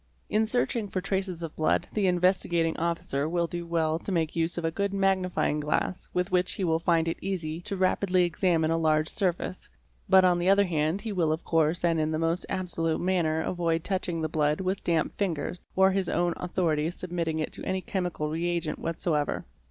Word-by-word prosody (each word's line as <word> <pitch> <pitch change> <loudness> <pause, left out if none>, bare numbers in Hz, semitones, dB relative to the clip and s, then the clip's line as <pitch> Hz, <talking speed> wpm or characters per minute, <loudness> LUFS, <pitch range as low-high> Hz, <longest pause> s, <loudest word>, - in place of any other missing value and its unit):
In 220 +1 +2
searching 235 -2 0
for 190 - -2
traces 190 -2 -2
of 165 - -6
blood 155 - +1
the 205 -3 +1
Investigating 175 -2 +2
Officer 160 -3 -1
will 170 0 +1
do 170 0 -5
well 160 -1 +1
to 195 - -5
make 165 -4 0
use 165 +1 0
of 170 - -2
a 165 - +1
good 200 +3 -1
magnifying 190 -5 +1
glass 150 +4 -1
with 180 +1 -1
which 180 0 +2
he 195 - -3
will 160 -2 +2
find 165 -1 +2
it 165 - -2
easy 170 -4 -3
to 195 +2 -4
rapidly 185 0 +2
examine 170 -2 +1
a 165 - +1
large 155 -1 +2
surface, 185 -2 -2 0.4
but 190 -1 +7
on 175 -1 +3
the 175 +2 +2
other 200 +1 +6
hand 160 +2 0
he 225 - -4
will 170 -5 +1
of 160 +2 -2
course 165 +2 +2
and 165 -1 +2
in 155 0 +1
the 155 - -1
most 165 +2 -1
absolute 165 -3 -1
manner, 170 -4 +1
avoid 165 -1 -1
touching 180 -4 -2
the - - +1
blood 150 -1 +1
with 190 +1 -2
damp 165 -2 +1
fingers 175 -3 -3
or 190 0 +5
on - - -1
his 195 -1 0
own 175 -1 +1
authority 165 -4 0
submitting 170 -2 -3
it 155 - -3
to - - -6
any 190 0 -1
chemical 180 -5 -2
reagent 170 +1 -1
whatsoever. 160 -3 -1
175 Hz, 205 wpm, -28 LUFS, 160-185 Hz, 0.4 s, but